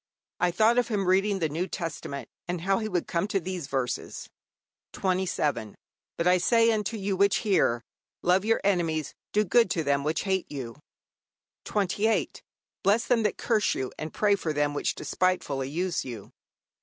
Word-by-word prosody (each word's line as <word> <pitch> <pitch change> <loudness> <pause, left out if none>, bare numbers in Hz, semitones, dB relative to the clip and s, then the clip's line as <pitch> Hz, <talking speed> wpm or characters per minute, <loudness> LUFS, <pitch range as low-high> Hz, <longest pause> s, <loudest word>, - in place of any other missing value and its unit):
I 180 - +3
thought 220 +7 +4
of 245 - +1
him 200 -5 -1
reading 195 +2 +3
the 165 -4 0
New 165 +5 -2
Testament, 155 -6 -5 0.2
and 175 -1 -3
how 195 +3 +1
he 215 -1 -3
would 180 -4 -1
come 170 +3 -1
to 200 - 0
these 180 -4 -5
verses: 130 -3 -3 0.7
'27. 180 - -1 0.4
But 170 - -1
I 180 0 +5
say 230 +5 +4
unto 215 0 -1
you 195 -1 -1
which 200 +1 +3
hear, 120 - +2 0.4
Love 180 +2 +3
your 225 +1 +2
enemies, 165 -6 0 0.2
do 210 - +3
good 230 +2 +4
to 165 -3 0
them 140 -1 +1
which 155 +2 0
hate 190 -2 -1
you, 130 -2 -6 0.9
'28. 210 +2 0 0.4
Bless 210 +5 +3
them 245 -2 +2
that 210 -2 0
curse 220 -4 +1
you, 130 -1 -3
and 155 0 -4
pray 210 -1 +2
for 170 -6 -1
them 145 0 +1
which 145 - -1
despitefully 145 -8 -1
use 175 +3 -1
you. 115 -6 -8
185 Hz, 170 wpm, -27 LUFS, 155-205 Hz, 0.9 s, I